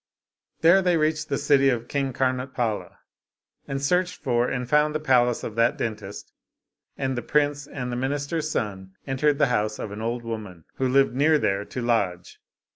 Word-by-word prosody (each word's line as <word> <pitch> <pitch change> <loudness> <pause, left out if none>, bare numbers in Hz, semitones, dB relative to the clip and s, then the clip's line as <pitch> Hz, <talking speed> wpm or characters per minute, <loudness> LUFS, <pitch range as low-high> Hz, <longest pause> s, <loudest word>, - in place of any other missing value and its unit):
There 170 +4 +6
they 180 -2 +2
reached 155 0 0
the 140 - 0
city 140 -1 +4
of 120 -2 -1
King 140 -1 -1
Karnotpala, 130 -3 -2 0.7
and 135 0 -3
searched 180 +6 +1
for 120 -3 +1
and 125 -2 -3
found 150 +3 +2
the - - +1
palace 125 -5 +2
of 110 - -5
that 115 +1 +3
dentist, 105 -3 -5 0.6
and 135 -1 -1
the 120 - -2
prince 145 0 0
and 125 -2 -5
the - - -2
minister's 145 +5 -2
son 95 -6 -4
entered 140 +2 +1
the - - +4
house 105 0 0
of 105 - -6
an 105 +1 -6
old 120 +1 -2
woman, 105 -8 -7
who 130 - +1
lived 135 -1 +3
near 150 +4 +4
there, 100 -7 0
to 125 - -5
lodge. 100 -7 -1
130 Hz, 180 wpm, -25 LUFS, 115-145 Hz, 0.7 s, There